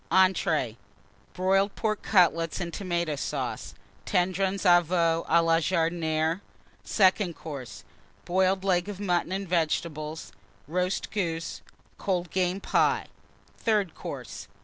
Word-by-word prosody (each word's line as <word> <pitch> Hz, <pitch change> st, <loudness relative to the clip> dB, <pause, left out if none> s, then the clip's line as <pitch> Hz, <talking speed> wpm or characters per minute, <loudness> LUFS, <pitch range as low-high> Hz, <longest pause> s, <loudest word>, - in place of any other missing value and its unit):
ENTREES. 185 Hz, -, +2 dB, 0.6 s
Broiled 195 Hz, +2 st, +2 dB
Pork 215 Hz, -2 st, -1 dB
Cutlets 165 Hz, -4 st, +3 dB
and 170 Hz, -2 st, -4 dB
Tomata 170 Hz, -5 st, -2 dB
Sauce. -, -, -4 dB, 0.3 s
Tendrons 185 Hz, +2 st, 0 dB
de 175 Hz, -1 st, +7 dB
Veau 165 Hz, -1 st, +1 dB
à 170 Hz, +1 st, +5 dB
la 165 Hz, 0 st, +4 dB
Jardinière. 165 Hz, 0 st, 0 dB, 0.4 s
SECOND 190 Hz, -3 st, +2 dB
COURSE. 140 Hz, -6 st, -8 dB, 0.4 s
Boiled 190 Hz, +1 st, +2 dB
Leg 180 Hz, 0 st, +1 dB
of 200 Hz, -2 st, -6 dB
Mutton 180 Hz, -3 st, 0 dB
and 195 Hz, +1 st, -3 dB
Vegetables. 160 Hz, -2 st, -2 dB, 0.4 s
Roast 180 Hz, +4 st, -1 dB
Goose. 165 Hz, -5 st, -3 dB, 0.4 s
Cold 180 Hz, -4 st, -1 dB
Game 185 Hz, 0 st, 0 dB
Pie. -, -, +2 dB, 0.5 s
THIRD 210 Hz, -7 st, +1 dB
COURSE. -, -, -7 dB
175 Hz, 115 wpm, -27 LUFS, 165-190 Hz, 0.6 s, de